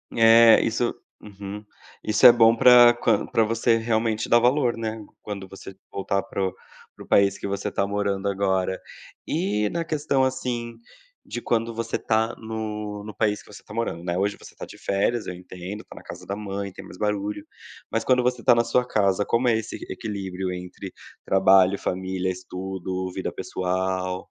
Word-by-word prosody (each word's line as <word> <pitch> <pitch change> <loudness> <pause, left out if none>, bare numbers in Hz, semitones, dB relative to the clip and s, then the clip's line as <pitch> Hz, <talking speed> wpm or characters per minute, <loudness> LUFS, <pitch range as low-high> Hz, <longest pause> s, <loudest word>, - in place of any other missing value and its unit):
É 115 0 +7
isso 115 +1 -1 0.3
uhum, 100 0 -9 0.4
isso 105 +4 +2
é 120 - +13
bom 115 -1 +5
para 120 0 +8
quan 120 - +1
para 115 - +2
você 115 +1 +2
realmente 110 -1 -1
dar 120 - +6
valor, 125 0 +2
né, 110 -1 -5 0.2
quando 100 -2 -7
você 95 0 -11 0.2
voltar 100 0 -1
para 95 -1 -2
o - - -5 0.4
para - - -11
o - - -18
país 100 -1 +3
que - - -7
você 100 0 -3
tá 100 - 0
morando 100 -1 -1
agora. 95 -1 0 0.5
E 105 +2 0
na 170 0 -2
questão, 145 -4 0
assim, 125 -3 -2 0.5
de 120 - -6
quando 115 0 0
você 115 - -3
tá 110 +1 0
no 105 -2 -5
no 105 0 -8
país 105 -1 0
que - - -16
você - - -11
está - - -13
morando, 105 -7 -3
né, 85 0 -2
hoje 100 +2 0
você - - -14
tá - - -7
de - - -13
férias, 105 +4 0
eu 90 - -4
entendo, 90 +3 -8
tá - - -14
na - - -11
casa - - -10
da 100 - -4
mãe, 100 -1 -5
tem - - -11
mais 90 - -12
barulho, 105 -1 -2 0.5
mas 115 - 0
quando 125 -1 +3
você 125 -1 0
está 120 - +5
na 115 - +3
sua 125 +1 +1
casa, 100 -2 +1
como 120 +1 +1
é 110 - +3
esse 110 0 -5
equilíbrio 95 -4 -4
entre 90 0 -8 0.3
trabalho, 95 0 +4
família, 95 0 -2
estudo, 95 0 -5
vida - - -3
pessoal? 95 0 -2
105 Hz, 185 wpm, -24 LUFS, 95-115 Hz, 0.5 s, é